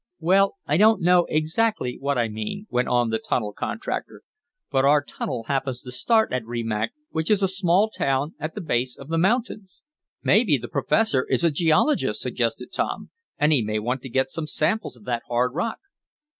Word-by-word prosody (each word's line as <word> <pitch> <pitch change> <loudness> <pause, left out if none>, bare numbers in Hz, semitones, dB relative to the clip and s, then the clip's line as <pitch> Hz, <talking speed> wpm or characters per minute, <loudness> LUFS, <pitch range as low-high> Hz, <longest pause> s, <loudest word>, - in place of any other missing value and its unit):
"Well, 195 +4 +3
I 150 - +1
don't 215 -1 +4
know 175 0 +4
exactly 155 - 0
what 140 0 -1
I 120 -1 +1
mean," 110 - -5
went 125 0 +1
on 120 -2 +1
the 110 - 0
tunnel 105 -4 -2
contractor, 225 - -5 0.5
"but 135 - +2
our 145 +1 +4
tunnel 125 -4 -5
happens 130 0 -2
to 125 - -8
start 220 - +2
at 130 -2 -1
Rimac, 115 - -2 0.2
which 160 0 -2
is 205 -2 +3
a - - +4
small 190 +1 +2
town 140 -6 -1
at 155 +1 -5
the 210 - -4
base 125 -6 -1
of 135 - -11
the 165 0 0
mountains." 215 0 -1 0.4
"Maybe - - +4
the - - -7
professor 185 -13 +1
is - - +1
a 170 - +4
geologist," 160 - +2
suggested - - -2
Tom, - - -3 0.3
"and 150 +1 +3
he 135 - +4
may 110 0 -2
want 125 +4 -2
to 130 - -8
get 130 +2 0
some 160 -2 -4
samples 155 - -1
of 110 - -18
that 120 +1 -2
hard 120 +1 0
rock." 180 +9 -2
145 Hz, 190 wpm, -24 LUFS, 125-185 Hz, 0.5 s, don't